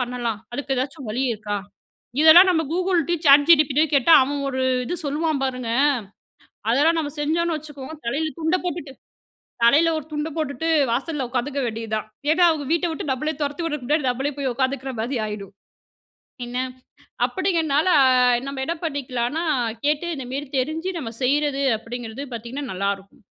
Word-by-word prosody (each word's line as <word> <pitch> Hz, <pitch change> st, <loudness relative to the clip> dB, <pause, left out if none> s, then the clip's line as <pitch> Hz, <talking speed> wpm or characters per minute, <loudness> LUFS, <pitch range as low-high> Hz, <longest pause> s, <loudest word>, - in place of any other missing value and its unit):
பண்ணலாம்? 240 Hz, -3 st, -2 dB
அதுக்கு 270 Hz, +2 st, -2 dB
ஏதாச்சும் 270 Hz, 0 st, -4 dB
வழி 245 Hz, +5 st, -1 dB
இருக்கா? 210 Hz, -1 st, -4 dB, 0.6 s
இதெல்லாம் 340 Hz, +4 st, +9 dB
நம்ம 320 Hz, -3 st, +2 dB
Googleடயும், 345 Hz, -2 st, 0 dB
Chat 280 Hz, +1 st, +9 dB
GPTடயும் 305 Hz, -1 st, +4 dB
கேட்டா, 280 Hz, +4 st, +5 dB
அவன் 285 Hz, +2 st, -2 dB
ஒரு 260 Hz, -1 st, -2 dB, 0.2 s
இது 300 Hz, -, -3 dB
சொல்லுவான் 300 Hz, 0 st, -1 dB
பாருங்க. 255 Hz, -3 st, -3 dB, 1.0 s
அதெல்லாம் 305 Hz, +7 st, +3 dB
நம்ம 295 Hz, -2 st, -2 dB
செஞ்சோனு 330 Hz, +3 st, 0 dB
வச்சுக்கோங்க, 295 Hz, -1 st, -9 dB
தலையில 310 Hz, +6 st, -1 dB
துண்ட 320 Hz, +3 st, +2 dB
போட்டுட்டு 310 Hz, -6 st, -4 dB, 0.7 s
தலையில 290 Hz, +8 st, +5 dB
ஒரு 310 Hz, -, -6 dB
துண்ட 300 Hz, +1 st, -2 dB
போட்டுட்டு 310 Hz, 0 st, -2 dB, 0.2 s
வாசல்ல 270 Hz, +4 st, -1 dB
உக்காந்துக்க 260 Hz, +3 st, -2 dB
வேண்டியது 225 Hz, -1 st, -5 dB
தான். 215 Hz, -, -4 dB, 0.2 s
ஏனா, 350 Hz, +3 st, +4 dB
அவங்க 310 Hz, -3 st, -1 dB
வீட்ட 340 Hz, +1 st, +2 dB
விட்டு 315 Hz, -, -5 dB
நம்மள 285 Hz, +4 st, -1 dB
துரத்தி 290 Hz, +2 st, -2 dB
விட 300 Hz, -, -1 dB
முன்னாடி 295 Hz, +4 st, +1 dB
நம்மளே 265 Hz, +4 st, -1 dB
போய் 275 Hz, -2 st, -1 dB
உக்காந்துக்குற 265 Hz, +1 st, -1 dB
மாரி 245 Hz, +3 st, -2 dB
ஆயிரும். 210 Hz, -2 st, -7 dB, 0.9 s
என்ன! 240 Hz, +1 st, -5 dB, 0.7 s
அப்டிங்கனால, 325 Hz, -5 st, 0 dB, 0.6 s
நம்ம 275 Hz, -1 st, -5 dB
என்ன 335 Hz, -, -2 dB
பண்ணிக்கலாம்னா, 275 Hz, 0 st, -2 dB, 0.4 s
கேட்டு 300 Hz, +3 st, +1 dB
இந்த 265 Hz, -3 st, -6 dB
மேரி 280 Hz, +2 st, -3 dB
தெரிஞ்சு, 315 Hz, +7 st, -2 dB
நம்ம 230 Hz, -6 st, -5 dB
செய்றது 280 Hz, +1 st, +1 dB, 0.2 s
அப்டிங்கறது 235 Hz, +2 st, -7 dB
பாத்தீங்கன்னா, 235 Hz, +5 st, -6 dB
நல்லா 200 Hz, +2 st, 0 dB
இருக்கும். 195 Hz, +6 st, -20 dB
280 Hz, 150 wpm, -23 LUFS, 250-315 Hz, 1.0 s, இதெல்லாம்